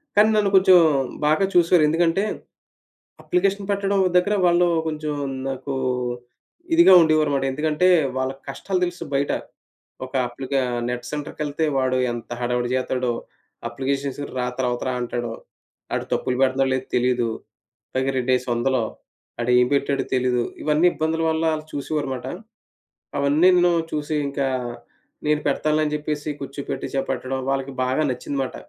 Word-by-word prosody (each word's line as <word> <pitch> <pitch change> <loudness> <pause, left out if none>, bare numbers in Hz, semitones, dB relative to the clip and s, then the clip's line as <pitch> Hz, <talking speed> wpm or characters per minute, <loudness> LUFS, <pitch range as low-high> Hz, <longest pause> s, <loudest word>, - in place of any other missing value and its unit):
కానీ, 210 +1 +6
నన్ను 210 -2 +3
కొంచుం 185 -1 +7 0.5
బాగా 155 +6 +3
చూశారు. 175 -1 +5
ఎందుకంటే, 165 +4 +2 1.0
అప్లికేషన్ 195 +2 0
పెట్టడం 200 0 +1 0.2
దగ్గరా 200 +4 +3
వాళ్ళూ 175 0 +4 0.2
కొంచుం 155 -1 -3 0.3
నాకూ 135 +1 -4 1.0
ఇదిగా 335 - +7
ఉండేవారుమాట. 155 -4 +2
ఎందుకంటే, 155 +5 +1 0.3
వాళ్ళకి 130 +1 -2
కష్టాలు 185 +7 -2
తెలుసు 175 -1 -5
బయట. 140 +1 +1 0.7
ఒక 130 +1 -11
అప్లికా 135 +2 -2 0.3
నెట్ 125 0 -4
సెంటర్‌కెళ్తే 150 +1 -3
వాడు 130 -1 +1 0.2
ఎంత 120 -2 -7
హడావిడి 120 0 -1
జేత్తాడో. 130 -1 0 0.6
అప్లికేషన్స్‌కి 140 +1 -3
రా, 125 - 0
తరవత 125 -1 -1
రా 130 - -1
అంటాడో. 120 -1 -3 0.6
ఆడు - - -2
తప్పులు 125 - 0
పెడతన్నాడో 135 0 +2
లేదో 130 0 -3
తెలీదు. 125 -1 +1 0.7
పైగా 130 +1 +1
రెండేసీ 125 0 +1
ఒందలు. 120 0 +1 0.6
ఆడేం 125 +1 +4
పెట్టాడో 140 0 0
తెలీదు. 125 -1 +1 0.2
ఇవన్నీ 155 +3 +3
ఇబ్బందుల 160 +1 -1
వల్లా, 160 0 +1
ఆళ్ళు 155 0 -6
చూసేవారుమాట. 140 -3 -3 0.9
అవన్నీను 175 +5 +4 0.2
చూసి 150 0 -3
ఇంకా, 140 0 -1 0.8
నేను 150 0 +2
పెడతానులే 155 +2 +1
జెప్పేసి, 150 0 -3
కూర్చోపెట్టి 140 0 -5
చే 135 - +2
పెట్టడం, 130 0 -2
వాళ్ళకి 135 0 -2
బాగా 130 +4 +1
నచ్చిందిమాట. 135 +1 -3
140 Hz, 125 wpm, -23 LUFS, 130-160 Hz, 1.0 s, కొంచుం